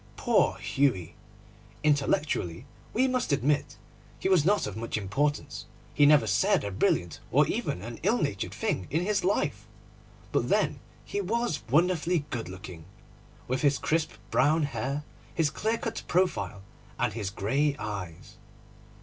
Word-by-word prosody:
Poor - - +2
Hughie! 125 - 0 0.7
Intellectually, 140 - +1 0.3
we 255 +4 +2
must 255 -6 0
admit, 145 +2 +1 0.4
he - - -2
was 185 -6 +5
not 205 +5 +3
of 105 - -5
much 115 0 -3
importance. 135 +9 -1 0.3
He 145 0 +5
never 145 -5 +6
said 105 0 +2
a 100 - -3
brilliant 90 -3 0
or - - +5
even 90 - -2
an 115 +1 -7
ill - - +2
natured - - -2
thing 95 - -2
in 165 +4 0
his 210 0 +1
life. 190 +3 0 0.6
But - - +1
then - - +2 0.3
he 205 - -2
was 230 -2 -1
wonderfully 170 +1 +2
good 115 -8 -3
looking, 90 -3 -9 0.6
with 130 +1 -1
his 140 -1 +3
crisp 160 0 0 0.2
brown 155 +3 +3
hair, 140 +2 -2 0.3
his 160 -4 +2
clear 220 +8 0
cut 225 0 -4
profile, 100 - 0 0.3
and - - 0
his 105 -3 -3
grey 135 +10 0
eyes. 90 -6 -6
140 Hz, 145 wpm, -28 LUFS, 105-165 Hz, 0.7 s, never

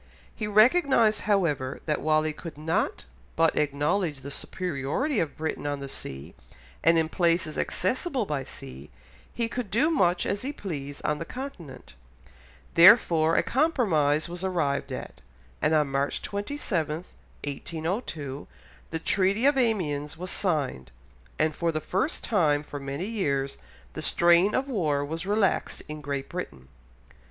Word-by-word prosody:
He 210 - -3
recognised, 225 - +4
however, 150 -10 +1
that 150 -2 0
while 155 0 +3
he 155 0 -1
could 160 0 -9
not 160 +2 -1 0.3
but 165 -1 +3
acknowledge 150 +2 0
the 140 +1 -7
superiority 180 - -2
of 160 - -2
Britain 155 -2 -3
on 145 -1 -2
the 140 - -6
sea, 70 - -7 0.5
and 165 +1 +5
in 160 -1 +2
places 170 -1 +1
accessible 255 - -1
by 145 -6 -2
sea, 70 - -10 0.4
he 235 -1 -1
could 235 -2 -4
do 270 - +2
much 180 - +2
as 200 - -1
he 270 - -3
pleased 145 - -6
on 150 -1 0
the - - -2
Continent, 180 - -8 0.8
therefore 170 -3 +7
a - - +3
compromise 190 - +2
was 175 +1 -6
arrived 165 -7 -1
at, - - -7 0.4
and 155 +1 +3
on 150 -3 +2
March 140 +1 -1
27, 200 - -2 0.5
1802, 155 - -4 0.4
the 165 - -2
Treaty 195 +7 +1
of 285 0 +5
Amiens 165 - 0
was 180 +2 -5
signed, 140 - -1 0.5
and 155 0 +2
for 170 -1 0
the 155 - -1
first 195 - -1
time 150 -9 +2
for 145 -1 -7
many 140 +5 -4
years 140 -11 -1 0.3
the - - -5
strain 175 +4 +4
of 265 +1 0
war 155 - 0
was 165 +5 -5
relaxed 205 -1 +1
in 150 0 -7
Great 140 -2 -3
Britain. 70 - -7
165 Hz, 145 wpm, -27 LUFS, 145-205 Hz, 0.8 s, therefore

